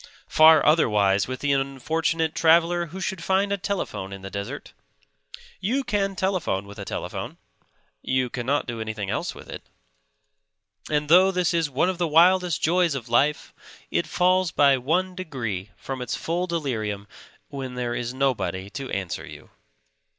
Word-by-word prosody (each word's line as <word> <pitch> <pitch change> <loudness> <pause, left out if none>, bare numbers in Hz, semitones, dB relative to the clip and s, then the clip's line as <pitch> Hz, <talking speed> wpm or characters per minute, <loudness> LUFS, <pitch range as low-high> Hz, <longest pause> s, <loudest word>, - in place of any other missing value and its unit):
Far 155 -1 +6
otherwise 105 -11 +3
with 130 0 -5
the 145 -1 +2
unfortunate 155 +4 -1
traveller 170 +1 +3
who 185 +5 -8
should 190 -2 -3
find 195 +2 +1
a - - +2
telephone 180 - -4
in 95 -1 -9
the 95 - -7
desert. 100 0 -6 0.9
You 245 +9 0
can 200 -4 -1
telephone 185 - -1
with 100 +1 -11
a 100 - -6
telephone; - - -5 0.6
you 130 -1 0
cannot 130 +4 -1
do 115 -2 -5
anything 110 -3 -4
else - - -3
with - - -12
it. - - -7 1.3
And 150 -1 0
though 180 +5 +6
this 180 -2 0
is 165 -3 +1
one 140 +6 +1
of 185 -1 -2
the 175 - +1
wildest 175 +1 +4
joys 170 -1 +2
of 125 -3 -6
life, 140 +6 +1 0.4
it - - 0
falls 185 0 +2
by 140 -3 +4
one 170 +9 0
degree 120 - -5
from 135 -1 -6
its 125 - -3
full 175 +2 -2
delirium 110 - -3 0.4
when 135 -3 -6
there 120 -1 -2
is 120 0 -3
nobody 125 -8 -1
to 135 -2 -6
answer 95 -4 -4
you. - - -12
145 Hz, 160 wpm, -24 LUFS, 120-175 Hz, 1.3 s, Far